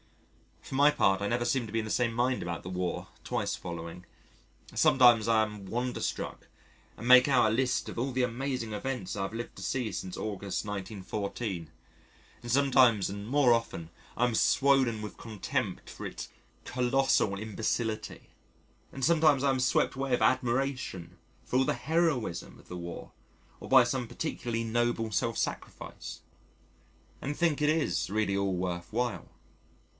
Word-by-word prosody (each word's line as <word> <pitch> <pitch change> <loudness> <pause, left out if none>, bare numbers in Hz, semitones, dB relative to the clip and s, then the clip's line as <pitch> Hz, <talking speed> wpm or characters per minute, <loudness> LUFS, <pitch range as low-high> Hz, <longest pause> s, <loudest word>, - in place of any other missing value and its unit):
For - - -10
my 145 +2 +6
part, 100 -10 +2
I 100 - 0
never 120 +2 0
seem 120 -1 0
to - - -10
be 115 - +1
in 110 - -2
the 110 - -5
same 120 -2 +1
mind 125 +2 +1
about 85 0 -4
the 90 - -6
War 90 -1 -3
twice - - -1
following. 85 +1 -7 0.7
Sometimes 120 -4 +5
I 110 -1 +4
am 105 -2 -6
wonderstruck 125 +5 -3 0.5
and 115 - -6
make 125 +1 +8
out 120 -6 +4
a - - 0
list 125 +2 0
of - - -6
all 130 +3 -1
the 130 0 +1
amazing 125 -1 -2
events 110 -2 -3
I 100 - -2
have 95 - -4
lived 120 +1 -6
to - - -8
see 125 -5 -2
since 95 -1 -5
August, 100 -3 -3
1914, 100 -2 -4 0.7
and 120 -1 -5
sometimes 130 -6 +4
and 100 +1 -6
more 135 -1 +4
often 115 -8 -2 0.3
I 120 - 0
am 125 - 0
swollen 130 -2 +3
with 105 - -7
contempt 110 -4 -3
for - - -8
its - - -6 0.3
colossal 125 -5 +1
imbecility. 110 +1 -3 0.6
And 135 - -6
sometimes 155 -3 +4
I 140 - +3
am 130 -1 +1
swept 130 +1 +2
away 135 0 -3
with 125 - +2
admiration 125 -7 0 0.3
for 125 - -1
all 130 - +4
the - - +1
heroism 155 - -1
of - - -19
the 90 - -6
War, 85 -1 -7 0.5
or - - -9
by 130 -1 +7
some 120 0 -2
particularly 120 -2 -3
noble 115 0 0
self 100 - 0
sacrifice, - - -5 1.0
and 145 +2 -3
think 160 -3 +1
it 150 - +3
is 155 - +1
really 105 -1 0
all 100 -1 0
worth 90 -1 -3
while. 120 -5 -2
120 Hz, 165 wpm, -30 LUFS, 100-130 Hz, 1.0 s, make